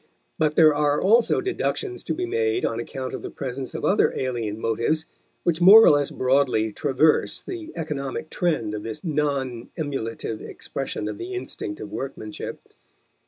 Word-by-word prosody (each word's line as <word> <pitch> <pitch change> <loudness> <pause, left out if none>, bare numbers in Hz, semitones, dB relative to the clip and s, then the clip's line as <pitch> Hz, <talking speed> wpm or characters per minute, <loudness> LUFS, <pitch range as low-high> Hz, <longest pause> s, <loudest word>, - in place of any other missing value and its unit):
But 155 -1 +2
there 155 -2 +7
are 145 0 +2
also 230 - +4
deductions 380 0 -2
to - - -1
be 365 +2 -2
made 425 0 0
on 115 - -1
account 130 +2 -5
of - - -5
the - - -6
presence 130 -1 -5
of - - -3
other - - +3
alien 115 -5 -2
motives 115 +9 0 0.4
which 170 -1 0
more 205 +5 +10
or - - +8
less 145 -1 +2
broadly 130 -5 +1
traverse 150 +4 +2
the 340 -4 -7
economic 150 -2 -4
trend 155 - 0
of 105 - -4
this 110 - -6
non 140 -7 -1
emulative 115 -7 -4
expression 105 - -5
of 105 -1 -5
the 125 +2 -5
instinct 120 -4 -5
of 105 - -7
workmanship. 110 -5 -6
140 Hz, 165 wpm, -24 LUFS, 115-165 Hz, 0.4 s, more